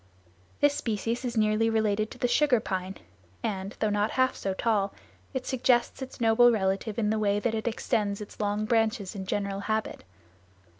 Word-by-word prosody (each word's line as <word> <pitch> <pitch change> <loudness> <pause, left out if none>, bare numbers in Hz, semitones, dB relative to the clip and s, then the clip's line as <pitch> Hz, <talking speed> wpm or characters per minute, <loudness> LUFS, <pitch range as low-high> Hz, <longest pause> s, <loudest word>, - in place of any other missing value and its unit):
This 290 0 +5
species 230 0 -2
is 240 -2 -3
nearly 215 +1 +3
related 215 -1 +1
to - - -11
the 245 - +1
sugar 250 0 +3
pine 190 -2 -4 0.5
and, 195 -2 -3
though 215 - +1
not 205 +1 +1
half 260 0 +1
so 195 -1 -3
tall, 205 -3 0 0.4
it 260 -2 -4
suggests 250 0 +1
its 260 - -7
noble 235 +1 +5
relative 200 0 -1
in 215 -2 +1
the 220 - 0
way 205 -1 +2
that 225 +1 -1
it 220 +1 -2
extends 215 -3 -1
its 210 - -10
long 210 0 0
branches 225 -3 +1
in 190 -2 -6
general 200 0 -2
habit. 220 +2 -2
215 Hz, 180 wpm, -28 LUFS, 205-235 Hz, 0.5 s, This